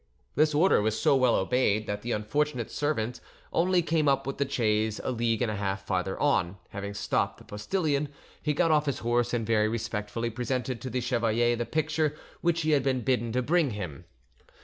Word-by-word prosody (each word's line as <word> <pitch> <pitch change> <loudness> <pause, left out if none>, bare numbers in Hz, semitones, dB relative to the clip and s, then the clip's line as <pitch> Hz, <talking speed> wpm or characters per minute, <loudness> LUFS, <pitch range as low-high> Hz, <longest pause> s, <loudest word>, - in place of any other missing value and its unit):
This 155 +1 +3
order 170 - +4
was 110 +1 0
so - - +4
well 130 -2 +4
obeyed 110 0 +1
that 105 0 -3
the 120 - -4
unfortunate 120 +4 -1
servant 125 -5 -1 0.3
only 180 +1 +3
came 160 -2 +1
up 135 0 +2
with 135 +1 -4
the 140 -1 0
chaise 110 -4 +1
a - - -1
league 115 -1 0
and 110 - 0
a - - -3
half 95 -1 -3
farther 95 -1 -1
on; 100 -10 +1
having 100 0 -6
stopped 105 - 0
the - - -15
postillion, 145 - -1 0.3
he 150 -1 0
got 165 +1 +3
off 150 -1 +3
his 140 - 0
horse, 120 0 +2
and 120 -2 -1
very 110 -1 +3
respectfully 115 +1 -3
presented 125 +1 -2
to 130 - -4
the 125 +1 -1
chevalier 120 0 +1
the 120 0 -3
picture 155 -1 0 0.3
which 170 -1 +1
he 155 0 +1
had 145 -2 +4
been 130 -1 0
bidden 120 -2 0
to 125 0 +1
bring 165 +1 +2
him. 85 -9 -6
120 Hz, 200 wpm, -28 LUFS, 110-145 Hz, 0.3 s, order